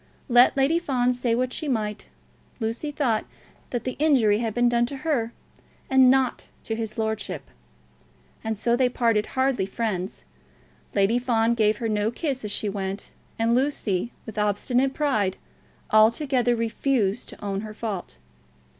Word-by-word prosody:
Let 245 +2 +6
Lady 285 +5 +3
Fawn 250 -6 +1
say 245 -2 0
what 255 +1 -1
she 310 - -3
might, 215 -5 -2 0.5
Lucy 230 +6 -3
thought 245 -7 0 0.5
that 245 - -3
the 255 - -4
injury 250 -9 +4
had 230 -1 -1
been 240 0 +3
done 240 0 +2
to 275 - -6
her, 240 -8 0 0.6
and 265 -1 +7
not 260 -1 +1
to 225 - -3
his 225 -1 -5
lordship. 220 -7 -2 1.0
And 220 -1 -2
so 235 +3 +2
they 250 0 +3
parted 230 -4 +1
hardly 260 -7 +2
friends. 195 -3 -3 0.7
Lady 205 +4 +3
Fawn 235 -2 +2
gave 215 -2 +2
her 230 - -2
no 210 0 +1
kiss 265 +1 -3
as 210 - -4
she 210 - -2
went, 195 0 -4 0.3
and 230 +1 +2
Lucy, 240 -6 0
with 220 -2 -6
obstinate 245 +6 +1
pride, 215 -11 +1 0.5
altogether 240 +3 +4
refused 230 -2 0
to - - -10
own 195 0 -2
her 215 0 -8
fault. 205 - -5
230 Hz, 155 wpm, -25 LUFS, 215-255 Hz, 1.0 s, and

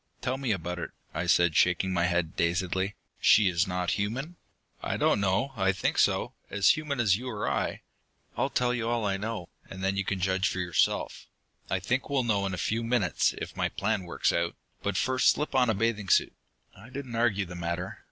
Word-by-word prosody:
"Tell 130 +1 -2
me 130 -4 -1
about 90 -2 -3
it," - - -4 0.2
I 85 +3 -2
said, 85 -2 +4
shaking 90 +1 +3
my 85 -1 +2
head 90 -2 0
dazedly. 95 +3 0 0.2
"She 105 -2 +6
is 85 +2 +1
not 90 -1 -1
human?" 135 +12 -3 0.5
"I - - -2
don't - - +3
know. 100 +8 +1
I 95 -2 +2
think 100 - -1
so. - - +2 0.2
As 100 -2 +3
human 150 -4 -2
as 100 -5 +4
you 125 +3 -6
or 105 -4 -3
I. - - -1 0.5
I'll - - 0
tell 125 0 +1
you 115 -1 -1
all 120 -2 0
I 95 -1 0
know, 105 -3 -4 0.2
and 95 0 -7
then 95 +1 0
you 100 - +1
can 95 0 -2
judge 95 +2 +1
for - - -4
yourself. 90 -3 0 0.4
I 95 - 0
think 125 +9 -1
we'll 140 -2 +1
know 100 -4 +1
in 95 - -4
a - - -8
few 115 +4 -1
minutes, 115 -6 +1
if - - -6
my - - 0
plans 110 -2 -1
work 85 - 0
out. 85 0 0 0.3
But 100 -2 -1
first 130 +4 +3
slip 150 - 0
on 125 -3 +3
a 110 - +2
bathing 105 -2 -1
suit." - - +4 0.4
I 105 +6 -14
didn't 130 -2 -7
argue 110 -4 +2
the 85 - -9
matter. 85 +1 -4
100 Hz, 210 wpm, -28 LUFS, 90-120 Hz, 0.5 s, She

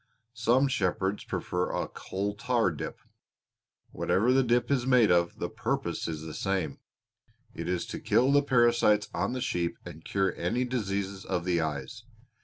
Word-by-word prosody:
Some 120 +3 +3
shepherds 95 -4 -1
prefer 90 0 -2
a - - -2
coal 100 +2 -4
tar 115 -3 +1
dip. 75 - -6 0.9
Whatever 115 +7 +2
the 135 - +5
dip 120 +1 +1
is 130 -2 +1
made 125 -6 +5
of, 85 -1 +2
the - - -2
purpose - - -2
is 80 -2 -4
the 80 -1 -7
same. 95 -2 -2 0.7
It - - -5
is 90 -1 -1
to - - -6
kill 130 +3 +3
the 145 0 +5
parasites 120 -5 +3
on 95 +7 -1
the 130 - -3
sheep 85 -8 -1
and 80 -2 -10
cure 95 -1 0
any 120 +9 0
diseases 100 -5 -2
of 85 - -2
the 85 -2 +1
eyes. 75 -4 -4
100 Hz, 165 wpm, -29 LUFS, 90-125 Hz, 0.9 s, the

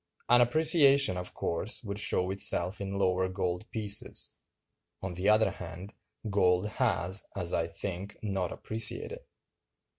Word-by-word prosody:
An 120 +1 +6
appreciation, 140 - +4
of 90 0 -6
course, 90 +9 -2
would 100 -1 -5
show 95 -3 0
itself 95 0 +3
in 100 0 -4
lower 95 -1 +1
gold 90 +2 -3
prices. 105 -2 +2 0.7
On 95 -1 -4
the 90 +4 0
other 110 +1 +3
hand, 90 +4 -9 0.3
gold 95 -1 +1
has, 95 -1 0
as 90 -3 -2
I 85 - 0
think, 95 +3 -6
not 95 -4 -2
appreciated. 110 0 -4
100 Hz, 130 wpm, -29 LUFS, 90-105 Hz, 0.7 s, An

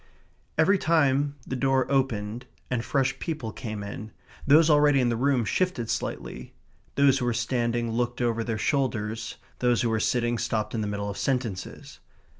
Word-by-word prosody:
Every 190 +5 +4
time 145 -4 +2
the 130 - -4
door 135 0 +2
opened 125 -3 -1 0.2
and 120 -2 0
fresh 135 +1 0
people 150 -9 -4
came 110 -4 -6
in, 105 +2 -7 0.4
those 155 +3 +7
already 145 -2 +5
in 125 -2 +2
the 120 - 0
room 130 -1 +2
shifted 150 - 0
slightly; - - -5 0.4
those 140 -1 +4
who 125 - -1
were 120 -1 0
standing 120 -2 0
looked 120 +1 -1
over 115 -2 0
their 115 -1 -2
shoulders; 110 -4 -1 0.2
those 120 -1 +2
who 115 - +1
were 110 - +1
sitting 120 +1 +1
stopped 110 -2 -1
in 115 - -1
the 105 - -2
middle 100 0 -3
of 100 - -7
sentences. 120 -9 -3
120 Hz, 170 wpm, -26 LUFS, 115-135 Hz, 0.4 s, those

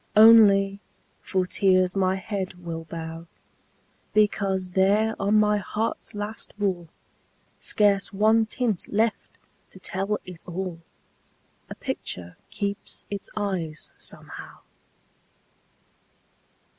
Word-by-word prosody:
Only, 205 -3 +7 0.4
for 185 -2 0
tears 185 -1 +3
my 190 -1 +2
head 190 -1 -4
will 165 -2 -6
bow, 165 0 -7 0.9
Because 195 -3 +2
there 205 +4 +3
on 200 +2 +2
my 210 -1 +4
heart's 215 +2 -3
last 205 +2 -6
wall, 185 -5 -1 0.7
Scarce 200 -2 +2
one 220 +2 +3
tint 220 -5 -1
left 220 +1 0 0.3
to - - -14
tell 195 +2 -2
it 180 -2 -9
all, 180 -1 -4 0.9
A - - -7
picture 90 -1 -5
keeps 200 -1 -4
its 200 -1 -5
eyes, 180 -7 -3
somehow. - - -5
195 Hz, 100 wpm, -25 LUFS, 180-210 Hz, 0.9 s, Only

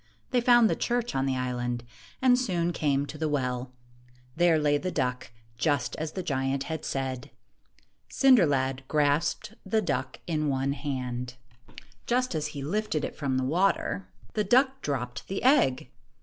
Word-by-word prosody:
They 245 - +3
found 240 -1 +6
the - - +1
church 240 0 -1
on 135 0 0
the 130 -1 0
island, 120 -1 -2 0.4
and 255 -1 +6
soon 175 -9 0
came 140 -3 +1
to 155 +1 -9
the 155 -1 0
well. 125 -3 -2 0.6
There 170 -1 +4
lay 145 -1 +2
the 185 - -3
duck, 125 -6 -2 0.3
just 140 -2 0
as 155 0 -4
the 185 - -4
giant 135 -2 -1
had 160 0 -5
said. 130 -2 -3 0.8
Cinder 255 - +5
lad 135 -1 0
grasped 150 +8 +1
the 215 +3 +1
duck 135 -9 -2
in 155 -3 -1
one 135 0 0
hand. 125 -3 -4 0.3
1 - - -23
15 - - -13 0.2
Just 255 -1 +1
as 155 -2 -1
he 145 -2 -6
lifted 165 -1 -1
it - - -6
from 135 -3 -1
the 130 - 0
water, 185 +6 0 0.3
the 210 - +1
duck 265 +5 +3
dropped 125 -4 -4
the 195 - -4
egg. 135 - +3
150 Hz, 170 wpm, -28 LUFS, 130-195 Hz, 0.8 s, found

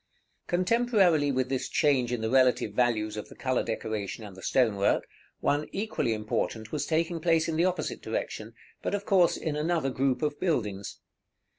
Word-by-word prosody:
§ - - -48
XXXVI. - - -44
Contemporarily 185 -6 +3
with 130 -1 0
this 130 -1 -2
change 130 -5 +2
in 120 -2 -2
the 110 - -1
relative 130 -1 +3
values 110 -4 +1
of 105 - -6
the - - -13
color 130 -1 0
decoration 110 -1 -4
and 100 -3 -10
the 95 - -12
stone 120 -3 +2
work, 100 - +1 0.3
one 145 +1 +1
equally 200 - -1
important 110 0 -3
was 150 - -2
taking 165 +1 0
place 165 -1 +2
in 165 - -1
the 170 +3 +3
opposite 185 -1 -2
direction, - - -4 0.3
but - - -1
of 200 0 -4
course 180 -3 +4
in 155 -3 -3
another 155 -2 0
group 130 0 0
of 150 -1 -1
buildings. 105 - -2
135 Hz, 185 wpm, -28 LUFS, 115-165 Hz, 0.3 s, course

